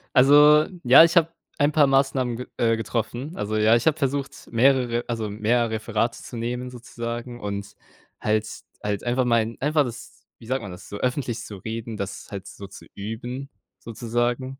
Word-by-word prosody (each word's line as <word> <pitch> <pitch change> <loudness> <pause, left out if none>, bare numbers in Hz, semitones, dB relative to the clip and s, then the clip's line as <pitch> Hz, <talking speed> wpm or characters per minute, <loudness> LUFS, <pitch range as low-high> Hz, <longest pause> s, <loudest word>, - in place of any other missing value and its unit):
Also, 150 +3 +7 0.2
ja, 130 +6 +9
ich 170 +2 +2
habe 165 -1 +4 0.3
ein 145 +1 +3
paar 150 -1 +5
Maßnahmen 135 -3 +1
ge 125 - -7
äh 115 -1 +2
getroffen, 120 - -3
also, 105 +1 -2
ja, 110 +2 +5
ich 120 - 0
habe 160 -1 +3
versucht, 140 -1 -3
mehrere 120 -1 +3
also, 115 -3 -3
mehr 115 +3 +1
Referate 110 +1 -2
zu 120 - -9
nehmen, 125 +2 -3
sozusagen, 120 0 -6
und 100 -1 -5 0.4
halt 110 0 +1 0.4
halt 105 -1 -2
einfach 125 +1 +1
mal 115 -1 +1
einfach 150 +1 +2
das, 120 -2 -9
wie 115 - -14
sagt 130 +1 -1
man 100 - -7
das, 90 +1 -11
so 100 - -6
öffentlich 125 -2 -2
zu 105 -4 -8
reden, 115 +2 -6
das 100 0 -6
halt 100 -2 -7
so 100 - -10
zu 95 - -13
üben, 120 +6 -6 0.3
sozusagen. 120 +4 -3
120 Hz, 175 wpm, -24 LUFS, 110-130 Hz, 0.4 s, ja